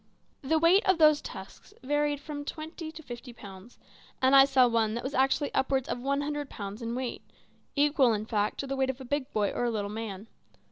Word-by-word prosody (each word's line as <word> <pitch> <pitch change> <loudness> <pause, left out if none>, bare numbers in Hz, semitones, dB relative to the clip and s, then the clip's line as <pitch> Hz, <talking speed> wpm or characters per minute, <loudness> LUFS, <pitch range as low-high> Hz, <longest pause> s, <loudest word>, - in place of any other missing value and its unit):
The 315 +4 +1
weight 340 +6 +5
of 375 - +5
those 305 -2 +5
tusks 190 -1 -10
varied 290 +1 0
from 290 0 -6
twenty 315 +2 -7
to 320 0 -11
fifty 240 -1 -9
pounds, 200 +1 -12 0.4
and 260 +1 +4
I 270 0 +9
saw 265 -2 +4
one 225 -2 +1
that 240 - -4
was 265 - -4
actually 270 +2 +1
upwards 265 -1 0
of - - -3
one 280 +3 -1
hundred 290 -1 -3
pounds 205 +2 -7
in 230 +1 -3
weight 255 -1 -4 0.5
equal, 285 -3 +4
in 215 0 -2
fact, 210 -2 -1
to - - -5
the 275 0 -3
weight 265 -1 0
of 265 0 -3
a 265 - -8
big 285 +1 -2
boy 205 -2 0
or - - -2
a - - +1
little 205 -3 -3
man. 215 -2 -6
265 Hz, 220 wpm, -29 LUFS, 230-290 Hz, 0.5 s, I